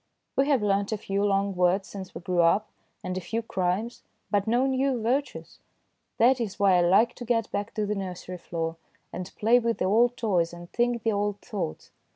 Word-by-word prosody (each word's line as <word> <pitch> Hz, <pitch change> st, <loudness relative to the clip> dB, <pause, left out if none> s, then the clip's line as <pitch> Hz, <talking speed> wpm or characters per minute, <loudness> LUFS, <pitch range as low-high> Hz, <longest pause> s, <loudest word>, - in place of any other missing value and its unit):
We 270 Hz, -, +3 dB
have 275 Hz, -7 st, +2 dB
learnt 200 Hz, 0 st, +1 dB
a 220 Hz, -, 0 dB
few 200 Hz, 0 st, -2 dB
long 200 Hz, -1 st, +1 dB
words 180 Hz, +2 st, +2 dB
since 190 Hz, -2 st, -9 dB
we -, -, -6 dB
grew 175 Hz, 0 st, +1 dB
up, 195 Hz, +6 st, +3 dB, 0.4 s
and 185 Hz, -, -3 dB
a 185 Hz, -, -3 dB
few 225 Hz, +6 st, -3 dB
crimes, 190 Hz, +3 st, -2 dB, 0.3 s
but 205 Hz, -1 st, +1 dB
no 240 Hz, +4 st, +3 dB
new 265 Hz, -1 st, +1 dB
virtues. 255 Hz, +6 st, -2 dB, 0.6 s
That 245 Hz, +2 st, +4 dB
is 210 Hz, -5 st, -3 dB
why 195 Hz, -2 st, +5 dB
I -, -, +4 dB
like 195 Hz, +7 st, +4 dB
to 245 Hz, -, -6 dB
get 230 Hz, -2 st, 0 dB
back 205 Hz, +3 st, -3 dB
to 215 Hz, -2 st, 0 dB
the 205 Hz, -, -1 dB
nursery 185 Hz, -2 st, -6 dB
floor, 165 Hz, -1 st, -4 dB, 0.4 s
and 180 Hz, 0 st, -6 dB
play 230 Hz, +3 st, +4 dB
with 230 Hz, -1 st, -1 dB
the -, -, 0 dB
old 235 Hz, +5 st, +3 dB
toys 175 Hz, -7 st, +1 dB
and 175 Hz, 0 st, -11 dB
think 240 Hz, -1 st, 0 dB
the 225 Hz, -, +2 dB
old 205 Hz, 0 st, -1 dB
thoughts. 180 Hz, -7 st, -5 dB
205 Hz, 205 wpm, -27 LUFS, 185-230 Hz, 0.6 s, why